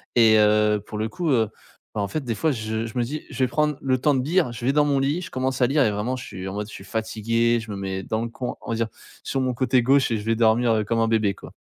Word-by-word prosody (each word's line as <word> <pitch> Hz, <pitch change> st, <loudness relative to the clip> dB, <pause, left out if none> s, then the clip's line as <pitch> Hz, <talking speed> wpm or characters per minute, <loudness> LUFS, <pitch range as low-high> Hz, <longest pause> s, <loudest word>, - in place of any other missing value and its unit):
Et 110 Hz, -2 st, +6 dB
heu, 105 Hz, 0 st, +4 dB
pour 105 Hz, -, -7 dB
le 110 Hz, +1 st, -1 dB
coup, 175 Hz, +4 st, -3 dB
heu, 115 Hz, -6 st, +2 dB, 0.5 s
bah -, -, -1 dB
en 100 Hz, -, -1 dB
fait, 155 Hz, +7 st, -3 dB
des 120 Hz, -3 st, -2 dB
fois 155 Hz, +9 st, +1 dB
je 110 Hz, -1 st, -3 dB
je 115 Hz, +2 st, -7 dB
me 120 Hz, -, +2 dB
dis: 150 Hz, +6 st, -5 dB
«Je 135 Hz, -3 st, -8 dB
vais -, -, +4 dB
prendre 150 Hz, +3 st, +1 dB
le 130 Hz, -1 st, +1 dB
temps 145 Hz, +2 st, +3 dB
de 130 Hz, -, 0 dB
lire». 165 Hz, -2 st, +1 dB
Je 120 Hz, -, -8 dB
vais 135 Hz, -, +4 dB
dans 150 Hz, 0 st, +4 dB
mon 140 Hz, -2 st, +2 dB
lit, 145 Hz, +6 st, 0 dB
je 180 Hz, -, -7 dB
commence 130 Hz, 0 st, -2 dB
à 125 Hz, -, +5 dB
lire 140 Hz, +2 st, +3 dB
et 110 Hz, -, +2 dB
vraiment, 105 Hz, +5 st, -2 dB
je 125 Hz, -, -7 dB
suis 95 Hz, 0 st, -7 dB
en 95 Hz, -, -5 dB
mode: 105 Hz, +1 st, -4 dB
je -, -, -12 dB
suis -, -, -9 dB
fatigué. 115 Hz, +2 st, 0 dB
Je 115 Hz, 0 st, -9 dB
me -, -, -4 dB
mets 95 Hz, -1 st, -4 dB
dans 110 Hz, 0 st, -2 dB
le 120 Hz, -, -4 dB
coi 125 Hz, +2 st, -5 dB
on -, -, -10 dB
va -, -, 0 dB
dire 115 Hz, 0 st, 0 dB, 0.4 s
sur 135 Hz, -, -1 dB
mon 130 Hz, -1 st, 0 dB
côté 130 Hz, +1 st, +2 dB
gauche 135 Hz, +2 st, +4 dB
et 115 Hz, -, +1 dB
je 105 Hz, -, -6 dB
vais 115 Hz, 0 st, +2 dB
dormir, 115 Hz, +1 st, +3 dB
heu, 110 Hz, -1 st, +1 dB
comme 115 Hz, +2 st, 0 dB
un 115 Hz, -, +2 dB
bébé, 110 Hz, -3 st, +2 dB
quoi. -, -, -12 dB
115 Hz, 320 wpm, -24 LUFS, 110-135 Hz, 0.5 s, Et